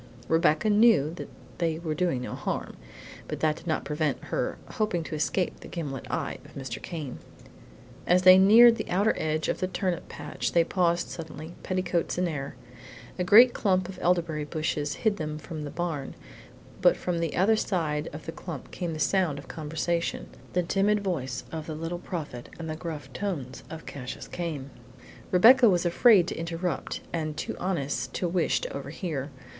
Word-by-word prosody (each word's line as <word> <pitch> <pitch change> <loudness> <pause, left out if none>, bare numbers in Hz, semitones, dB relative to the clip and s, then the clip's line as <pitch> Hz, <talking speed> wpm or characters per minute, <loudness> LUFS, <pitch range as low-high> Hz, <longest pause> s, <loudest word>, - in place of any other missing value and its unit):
Rebecca 160 +2 +3
knew 210 -8 +5
that - - -7 0.3
they 165 -2 0
were 160 -2 -3
doing 160 -7 0
no - - -5
harm, - - -4 0.5
but - - -4
that 155 -1 +2
did - - -12
not 160 - -1
prevent 150 -2 -1
her - - -2
hoping 200 -6 -1
to 160 - -7
escape 165 +4 -1
the - - -11
gimlet 140 -7 -5
eye - - -2
of - - -16
Mr. 130 -3 -5
Came. 155 -7 -6 0.9
As 180 +1 +4
they 185 0 +9
neared 230 +4 +8
the - - -5
outer 200 +5 +3
edge 155 0 -1
of - - -1
the 185 - 0
turnip 185 -1 -2
patch 145 - -4
they 170 - +5
paused 170 -1 +1
suddenly, 160 0 -8
petticoats 185 -2 -1
in 180 0 +1
air. 140 -4 -4 0.6
A - - +2
great 230 +7 +8
clump 185 -3 +1
of 185 -1 -9
elderberry 170 -3 +1
bushes 150 -1 -2
hid 210 -2 +3
them 150 -1 -4
from 155 0 -6
the - - -5
barn, 165 -4 -3 0.7
but - - +5
from 175 -2 -2
the 165 -2 -2
other 200 +5 +4
side 160 -8 -1
of 150 +1 -9
the 165 - -4
clump 165 -5 -8
came 175 -3 -3
the - - -4
sound 180 -5 +2
of 140 - -9
conversation: 165 +2 -2 0.2
the 180 - +2
timid 200 +4 +2
voice 135 -10 -2
of 160 -1 -5
the 155 - -4
Little 165 +2 -4
Prophet 150 -9 -6
and 165 - -6
the 155 - -3
gruff 155 -5 -7
tones 145 -7 -4
of 160 0 -8
Cassius 130 -2 -7
Came. 155 -6 -5 0.6
Rebecca 235 +6 +7
was 180 -2 +2
afraid 180 +1 +5
to - - -4
interrupt, 165 +2 -3
and 155 -3 -2
too - - -3
honest 165 -7 -2
to 180 - 0
wish 175 +1 +1
to - - -5
overhear. 150 -7 -4
170 Hz, 180 wpm, -27 LUFS, 150-185 Hz, 0.9 s, they